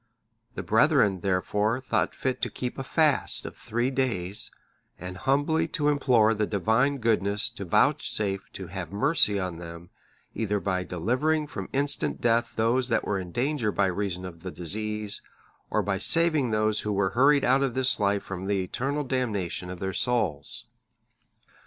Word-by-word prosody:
The - - -4
brethren, 95 -2 +3
therefore, 105 +5 0
thought 125 -2 -1
fit 130 -2 -2
to - - 0
keep 125 +1 -5
a - - -3
fast 150 +1 +2
of - - -7
three 120 +4 -2
days, 105 -8 -1 0.5
and 90 +1 -7
humbly 145 - +1
to 150 -1 +2
implore 125 -6 +3
the 105 -1 -1
Divine 110 +8 +1
goodness 105 -2 0
to 100 - -7
vouchsafe 95 +2 0
to 95 - -7
have 90 0 -6
mercy 105 -1 +3
on 90 -3 -4
them, 85 0 -10 0.4
either 105 -2 -1
by 95 -1 -1
delivering 125 - 0
from 150 - -7
instant 140 +1 0
death 120 0 +1
those 120 +3 +1
that 115 - +1
were 100 -2 -1
in 90 -2 -7
danger 125 - 0
by 100 - +1
reason 95 -1 -2
of 85 -2 -9
the 90 - -5
disease, 105 +4 -3 0.5
or - - +1
by - - -1
saving 160 -6 +3
those 110 -1 +2
who 105 - -2
were 100 -1 +1
hurried 140 +3 +4
out 130 +2 +4
of 135 -3 0
this 130 -2 +3
life 100 -1 +1
from 95 0 -6
the 100 -2 +1
eternal 140 +10 -2
damnation 110 -10 -2
of 90 -1 -7
their 95 +1 -3
souls. 95 - -1
110 Hz, 165 wpm, -27 LUFS, 95-130 Hz, 0.5 s, hurried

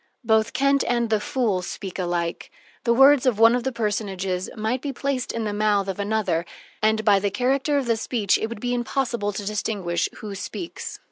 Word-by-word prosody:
Both 220 -1 +2
Kent 275 0 +3
and 235 -2 0
the 215 - +3
fool 225 -7 0
speak 190 +1 -6
alike. 175 -1 -2 0.4
The 235 - +4
words 270 +1 +6
of 240 -5 +2
one 225 +1 +7
of 245 -1 0
the 265 - -1
personages 195 -5 -2
might 220 +4 -1
be 285 - -3
placed 270 -1 -2
in 230 - -3
the 210 -1 -2
mouth 205 -1 +1
of 195 +1 -4
another, 205 -5 0 0.4
and 220 0 +2
by 205 -2 +5
the 200 +1 0
character 265 +6 +1
of 275 - 0
the 230 -1 +2
speech 220 -3 +1
it 220 - -1
would 235 -1 -7
be 245 +2 -1
impossible 240 -3 -1
to 205 0 -5
distinguish 195 -4 -1
who 210 -2 -7
speaks. 205 - -6
220 Hz, 200 wpm, -24 LUFS, 200-245 Hz, 0.4 s, one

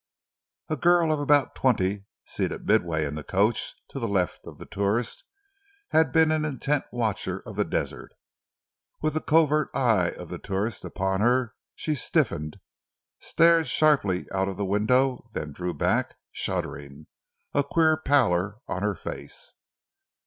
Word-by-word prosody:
A 155 - -1
girl 170 +1 +3
of 150 - -1
about 145 -1 +3
twenty, 100 -5 +1 0.2
seated - - -3
midway 80 -3 +2
in 70 - -4
the 75 0 -6
coach 105 +6 0
to 135 - -6
the 115 - -2
left 95 -4 -1
of - - -10
the - - -10
tourist, 100 +4 -2 0.6
had 160 -3 +3
been 160 -1 +4
an 155 -1 +1
intent 145 -1 -1
watcher 110 -5 -2
of - - -8
the - - +2
desert. - - -4 0.9
With 155 -1 +1
the 155 - -1
covert 155 -2 +3
eye 115 -10 +3
of - - -9
the - - -6
tourist 100 +3 -3
upon 95 +1 -2
her 120 0 +2 0.2
she 155 - -2
stiffened, 75 - -1 0.6
stared 165 -1 +3
sharply 135 -13 +2
out 95 0 +1
of 95 -1 -4
the 100 - -1
window, 120 +5 +1
then 75 -1 -4
drew 90 +4 -4
back, - - 0
shuddering, 70 +1 -4 0.5
a 145 - +2
queer 160 +2 +3
pallor 110 - +2
on 95 - -3
her 105 0 0
face. - - -8
120 Hz, 150 wpm, -26 LUFS, 95-150 Hz, 0.9 s, been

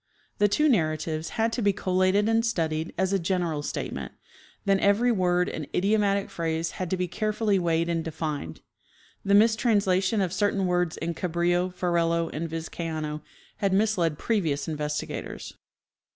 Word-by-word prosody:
The 205 - +5
two 300 +10 +2
narratives 155 - 0
had 225 0 +1
to 245 - -1
be 205 -2 +4
collated 185 +3 +2
and 225 0 +3
studied 160 -7 -1
as 190 +2 +1
a 195 - +2
general 170 -4 -1
statement; - - -5 0.5
then 195 -1 +3
every 210 +6 +3
word 180 -4 +2
and 155 -3 -5
idiomatic 200 0 +2
phrase 165 0 -2
had 185 -2 -4
to 185 - 0
be 180 0 -1
carefully 210 +2 0
weighed 170 -1 +1
and 165 -1 -1
defined. 150 - -4 0.6
The 200 0 +3
mistranslation 210 -3 +3
of 185 -3 0
certain 200 0 +1
words 180 -2 0
in 170 +1 -3
Cabrillo, 175 +1 0
Ferrelo 170 -2 0
and 165 +2 -3
Vizcaino 160 -1 -4 0.4
had 195 -2 0
misled 190 -7 +2
previous 165 -11 -1
investigators. 150 -1 -4
180 Hz, 150 wpm, -26 LUFS, 165-200 Hz, 0.6 s, The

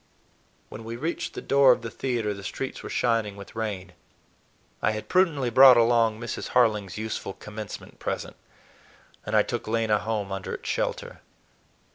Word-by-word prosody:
When 110 - -9
we 115 +1 -6
reached 160 +8 -4
the - - -6
door 140 -1 +5
of 125 -1 +1
the 115 - -5
theater, 120 -5 -2
the 100 0 -10
streets 130 +6 -5
were - - -7
shining 115 -4 0
with 100 +2 -12
rain. 100 -5 -4 0.9
I 110 - +2
had 110 - -6
prudently 160 -9 +2
brought 130 0 +9
along 115 -2 +3
Mrs. 115 0 -5
Harling's 105 -7 +2
useful 110 -2 -4
Commencement 105 0 -9
present, - - -4 0.9
and - - -1
I - - +6
took - - -4
Lena 110 -1 +1
home 105 -3 -3
under 95 -1 -4
its - - -10
shelter. - - -3
110 Hz, 160 wpm, -26 LUFS, 105-120 Hz, 0.9 s, brought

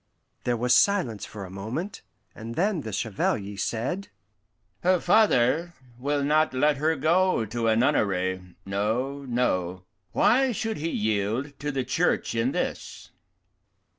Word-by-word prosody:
There 120 -1 +1
was 125 +2 +2
silence 180 - +2
for 100 -3 -8
a 90 - -11
moment, 115 - -5 0.3
and 115 +1 -8
then 190 -1 +1
the 110 - -6
Chevalier 100 -1 -1
said, 125 - -2 0.7
"Her 185 0 +3
father 175 - +3 0.2
will 145 +2 0
not 155 -1 +2
let 145 +2 +3
her 155 +3 +1
go 165 -2 +2
to 115 +2 -2
a 110 - +4
nunnery 95 -8 0
no, 115 +8 -2
no. 95 -8 -1 0.3
Why 260 +1 +3
should 225 0 -2
he 160 +3 -2
yield 110 +5 -1
to 145 +1 -2
the 135 -2 -1
Church 165 +7 0
in 115 +3 +1
this?" - - -4
130 Hz, 135 wpm, -26 LUFS, 110-160 Hz, 0.7 s, a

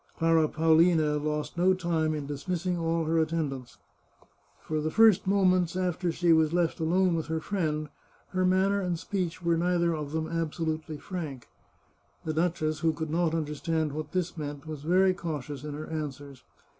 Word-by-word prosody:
Clara 165 -1 +3
Paolina 160 -1 +3
lost 150 +2 -3
no 185 +1 +4
time 165 -3 0
in 150 -2 -4
dismissing 175 +5 -2
all 165 -1 0
her 165 +1 +2
attendants. 150 -6 -2 0.8
For 155 -1 -3
the 155 - -1
first 215 0 +5
moments 185 -3 +3
after 180 -1 -1
she 170 0 +3
was 160 -1 +3
left 175 -1 +1
alone 180 +3 +2
with 160 -1 -2
her 160 0 -1
friend, 155 -4 -2 0.4
her 185 0 0
manner 190 +2 +2
and 180 -2 -1
speech 180 -1 -3
were 170 -1 +2
neither 170 0 +1
of 150 -2 -5
them 160 0 -2
absolutely 160 -1 -3
frank. 150 -9 -6 0.8
The 155 - -1
duchess, 155 -2 0
who 165 -1 +2
could 160 -1 -4
not 165 0 +1
understand 155 0 -1
what 155 +1 -5
this 180 -2 -2
meant, 145 -2 -6
was 155 -2 -6
very 185 +4 +3
cautious 145 -5 -5
in 150 -1 -5
her 155 +1 -6
answers. 145 -4 -6
160 Hz, 170 wpm, -28 LUFS, 155-175 Hz, 0.8 s, first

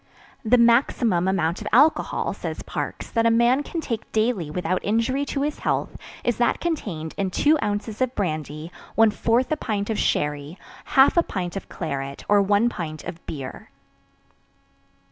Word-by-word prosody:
The 245 +2 +4
maximum 235 -6 +3
amount 175 -2 0
of 205 - -5
alcohol, 285 +7 +3
says - - -6
Parkes, - - -5
that 230 0 +2
a - - +5
man 235 +4 +4
can 325 +3 -4
take 230 -7 -5
daily 215 -7 0
without 180 +3 -2
injury 230 +7 +1
to 280 -1 -2
his 295 +1 -2
health - - -1 0.3
is 240 - 0
that 240 - +2
contained 195 - -3
in 195 -1 0
2 295 - +3
oz. 210 +2 -3
Brandy, 155 -3 -3 0.3
1/4 225 +2 +3 0.4
pt. - - -11
of 215 - -1
sherry, 150 +3 -1 0.3
1/2 275 +6 +5 0.2
pt. - - -13
of 195 - -6
claret, 140 0 -5
or 205 0 +5
1 205 +3 +3
pt. 155 -9 -5
of 175 0 -8
beer. 135 -4 -7
210 Hz, 150 wpm, -24 LUFS, 170-240 Hz, 0.4 s, a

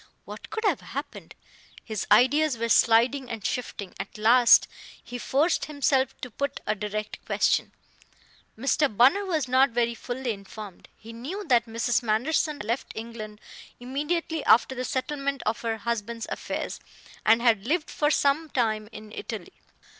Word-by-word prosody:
What - - -10
could 440 0 -4
have - - +2
happened? - - -7 0.5
His 220 -3 -4
ideas 290 +1 +4
were 230 +1 -2
sliding 240 +4 +4
and 225 -3 -6
shifting. 210 -6 -4
At 195 +2 -6
last 235 +3 +6 0.4
he 245 +1 -7
forced 285 +9 +1
himself 270 -3 0
to 250 - -6
put 280 +5 -3
a 210 - +1
direct 210 +1 -5
question. - - +1 0.9
Mr. 270 -1 +1
Bunner 275 +12 +5
was 315 -7 0
not 260 +2 +4
very 235 0 0
fully 245 +2 -4
informed. 200 -1 -9
He 225 +1 -11
knew 320 - -6
that 240 -2 +4
Mrs. 230 +2 0
Manderson 255 +8 +1
had 285 - -7
left 235 +5 -3
England 220 -2 -7 0.4
immediately 295 +5 -2
after 240 +3 +5
the 255 0 -4
settlement 275 +1 -2
of 220 - -1
her 225 -1 -2
husband's 230 0 -3
affairs, - - -4 0.4
and 225 +2 +5
had 230 -3 +2
lived 315 +2 0
for 295 - +1
some 300 +2 +2
time 215 -5 -1
in 215 -1 -11
Italy. 215 -4 -7
240 Hz, 155 wpm, -26 LUFS, 220-280 Hz, 0.9 s, last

